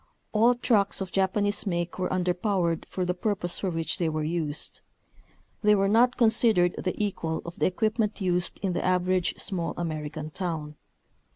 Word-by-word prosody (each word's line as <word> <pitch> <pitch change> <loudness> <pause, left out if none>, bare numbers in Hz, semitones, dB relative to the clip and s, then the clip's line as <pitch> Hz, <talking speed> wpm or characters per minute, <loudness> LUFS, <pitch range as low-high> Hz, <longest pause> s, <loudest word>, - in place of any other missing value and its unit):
All 230 +3 +4
trucks 220 -5 +2
of 190 -2 -4
Japanese 205 +2 0
make 175 -1 -2
were 180 - 0
underpowered 180 -1 0
for 185 - -2
the 180 - 0
purpose 180 -2 -2
for 195 - -1
which 165 +2 -2
they 170 -2 +1
were 155 0 -2
used. 155 -2 -3 0.8
They 210 -1 +5
were 195 -1 +2
not 240 +4 +4
considered 220 -6 +4
the 185 - -2
equal 170 -6 -2
of 170 0 -8
the - - +3
equipment 215 +3 0
used 180 -2 -1
in 190 -2 0
the - - -2
average 185 0 +1
small 180 -5 -3
American 155 -2 -4
town. 155 -3 -4
185 Hz, 165 wpm, -27 LUFS, 170-205 Hz, 0.8 s, They